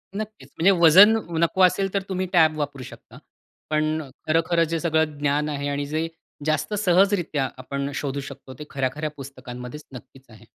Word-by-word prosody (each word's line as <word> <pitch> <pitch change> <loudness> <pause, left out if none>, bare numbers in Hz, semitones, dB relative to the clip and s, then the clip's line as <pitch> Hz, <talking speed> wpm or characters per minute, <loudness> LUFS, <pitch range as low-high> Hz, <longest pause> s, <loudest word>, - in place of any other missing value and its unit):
नक्कीच, 215 +1 -7
म्हणजे 180 +5 +5
वजन 190 +7 +8 0.2
नको 170 +3 +1
असेल 195 +1 +2
तर 200 - +1
तुम्ही 185 0 -1
टॅब 160 -3 +4
वापरू 145 -3 -4
शकता. - - -13 0.5
पण 155 +1 0
अ, 140 - -11 0.2
खरं-खरं 165 +1 +2
जे 165 - 0
सगळं 160 -2 0
ज्ञान 145 +1 0
आहे 145 -1 -3
आणि 145 0 -2
जे 155 +3 -2 0.4
जास्त 155 +4 -1
सहजरित्या 185 -7 +2
आपण 140 +2 -4
शोधू 140 -1 -3
शकतो, 135 -1 -10
ते - - -6
खऱ्या-खऱ्या 140 +3 -2
पुस्तकांमध्येच 130 0 -9
नक्कीच 130 +1 -13
आहे. 110 -3 -16
155 Hz, 165 wpm, -23 LUFS, 140-170 Hz, 0.5 s, वजन